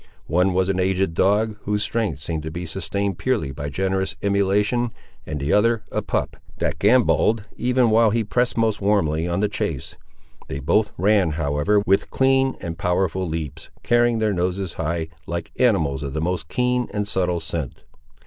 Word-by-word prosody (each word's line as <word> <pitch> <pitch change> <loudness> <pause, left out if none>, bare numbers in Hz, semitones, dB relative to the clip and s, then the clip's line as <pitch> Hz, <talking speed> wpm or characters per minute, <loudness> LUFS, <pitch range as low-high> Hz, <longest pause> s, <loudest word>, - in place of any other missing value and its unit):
One 90 +3 +2
was 95 0 +2
an 95 -1 0
aged 95 -1 +1
dog, 105 +5 +2
whose 105 0 -1
strength 105 -13 -2
seemed 80 -1 -3
to 80 - -5
be 85 +3 -5
sustained 95 +3 -3
purely 120 - 0
by 70 +2 -5
generous 95 +2 -1
emulation, 100 +4 +1 0.4
and 75 -1 -3
the 70 +2 0
other 115 +1 +3
a - - -1
pup, - - -2 0.2
that - - -2
gambolled 110 -2 +3
even 125 -1 +2
while 115 0 +5
he 115 +2 +1
pressed 120 +4 0
most 110 -2 +1
warmly 85 -6 +1
on 85 +3 -1
the 105 - +3
chase. 105 - -4 0.5
They 65 - -4
both 105 +10 +1
ran, 95 -3 +3
however, 75 +7 +1
with 95 +1 +2
clean 135 0 +2
and 85 -2 -6
powerful 90 +1 0
leaps, 80 -1 -5
carrying 120 -1 +3
their 110 -2 +1
noses 90 0 -2
high, 80 0 -2 0.2
like 85 0 -4
animals 80 - +2
of 70 -2 -5
the - - 0
most 85 -2 -2
keen 125 0 0
and 105 -1 -2
subtle 90 -3 0
scent. 80 -5 -5
95 Hz, 175 wpm, -22 LUFS, 80-110 Hz, 0.5 s, while